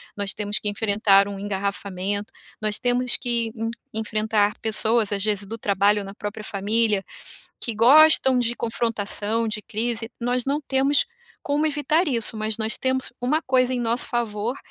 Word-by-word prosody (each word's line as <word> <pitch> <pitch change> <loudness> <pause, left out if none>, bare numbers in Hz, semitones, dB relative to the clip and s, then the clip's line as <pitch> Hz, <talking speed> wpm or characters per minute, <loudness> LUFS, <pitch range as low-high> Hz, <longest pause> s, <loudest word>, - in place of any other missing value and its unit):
nós 200 -1 -1
temos 210 0 -2
que 210 - -2
enfrentar 200 -1 +3
um 200 -1 -6
engarrafamento, 200 0 -3 0.3
nós 215 -1 0
temos 245 0 +2
que 235 -2 -1
en 225 -1 -3 0.2
enfrentar 215 -1 0
pessoas, 220 0 +1
às 200 -1 -1
vezes 205 -1 0
do 225 +3 -6
trabalho 205 0 +2
ou 200 - -6
na 195 +1 -9
própria 210 0 -6
família, 210 0 0 0.6
que 230 - -2
gostam 265 +2 +6
de 240 -1 0
confrontação, 225 -1 -1
de 215 0 -3
crise. 225 +1 -3
Nós 245 +1 0
não 280 +2 -1
temos 275 0 +2 0.4
como 295 +2 0
evitar 305 +3 +1
isso, 235 -5 -1
mas 215 0 -2
nós 220 0 0
temos 260 0 -1
uma 275 +6 +1
coisa 255 -1 +2
em 245 - -1
nosso 235 +1 +1
favor, 235 +1 -2
225 Hz, 165 wpm, -23 LUFS, 205-245 Hz, 0.6 s, gostam